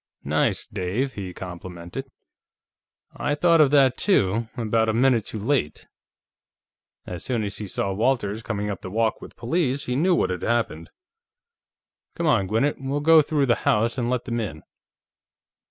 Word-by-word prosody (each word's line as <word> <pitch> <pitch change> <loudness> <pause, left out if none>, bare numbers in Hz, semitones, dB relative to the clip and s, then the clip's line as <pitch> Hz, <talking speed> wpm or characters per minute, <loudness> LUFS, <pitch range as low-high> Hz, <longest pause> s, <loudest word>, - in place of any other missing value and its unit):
"Nice, - - 0
Dave," 110 +9 -2
he 95 -3 -6
complimented. 90 +7 -8 1.1
"I 145 0 -1
thought 165 +1 +4
of 145 - +5
that, 135 -3 +4
too, 115 - +2
about 110 -1 +1
a - - +1
minute 120 -3 +3
too - - -5
late. 110 - -1 1.2
As 90 -2 -6
soon 120 -4 -1
as 100 -1 -3
he 105 - -5
saw 95 +1 -2
Walters 110 -1 0
coming 105 -2 -3
up 100 - -6
the 95 - -7
walk 110 +2 0
with - - -10
the - - -31
police, 140 +2 0
he 125 - -2
knew 175 +6 +3
what - - +1
had 90 - -4
happened. 115 -9 -1 1.3
Come 170 - -2
on, 115 -11 +3
Gwinnett; 115 +8 0
we'll 135 +2 -2
go 160 +2 +6
through 145 -1 +1
the 120 -2 +2
house 115 +2 +2
and 120 -2 -1
let 125 -1 -1
them 120 -2 -2
in." 80 -9 -5
115 Hz, 170 wpm, -24 LUFS, 100-135 Hz, 1.3 s, go